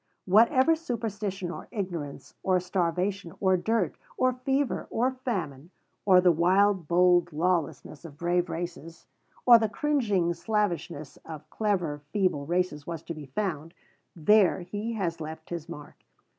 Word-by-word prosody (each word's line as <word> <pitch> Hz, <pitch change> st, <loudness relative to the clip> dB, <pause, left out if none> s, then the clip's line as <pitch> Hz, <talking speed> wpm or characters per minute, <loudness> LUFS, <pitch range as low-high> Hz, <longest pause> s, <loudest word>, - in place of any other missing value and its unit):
Wherever 235 Hz, -, +5 dB
superstition 210 Hz, -, -4 dB
or -, -, -8 dB
ignorance 175 Hz, -, -5 dB
or 185 Hz, -1 st, +2 dB
starvation 180 Hz, +1 st, -1 dB
or 190 Hz, -1 st, +3 dB
dirt 195 Hz, -1 st, 0 dB, 0.2 s
or 255 Hz, 0 st, +2 dB
fever 270 Hz, +2 st, -1 dB
or 250 Hz, +3 st, +1 dB
famine, 180 Hz, -, -4 dB, 0.4 s
or 185 Hz, -2 st, +7 dB
the 180 Hz, -1 st, +5 dB
wild 185 Hz, +1 st, +3 dB
bold 175 Hz, 0 st, +4 dB
lawlessness 165 Hz, -2 st, -1 dB
of 155 Hz, -4 st, -11 dB
brave 175 Hz, +2 st, 0 dB
races, 170 Hz, 0 st, -6 dB, 0.4 s
or 240 Hz, -2 st, +9 dB
the 220 Hz, -1 st, 0 dB
cringing 210 Hz, -9 st, +1 dB
slavishness 170 Hz, -7 st, -2 dB
of 155 Hz, -2 st, -10 dB
clever 180 Hz, -9 st, -1 dB
feeble 185 Hz, -9 st, 0 dB
races 175 Hz, -4 st, -1 dB
was 165 Hz, -2 st, -5 dB
to 170 Hz, -, -5 dB
be 150 Hz, -3 st, -9 dB
found, 165 Hz, 0 st, -3 dB, 0.4 s
there 190 Hz, +3 st, +4 dB
he 205 Hz, +6 st, -4 dB
has 175 Hz, -7 st, -3 dB
left 160 Hz, +1 st, -8 dB
his 170 Hz, -1 st, -5 dB
mark. 150 Hz, -4 st, -11 dB
180 Hz, 140 wpm, -27 LUFS, 165-210 Hz, 0.4 s, or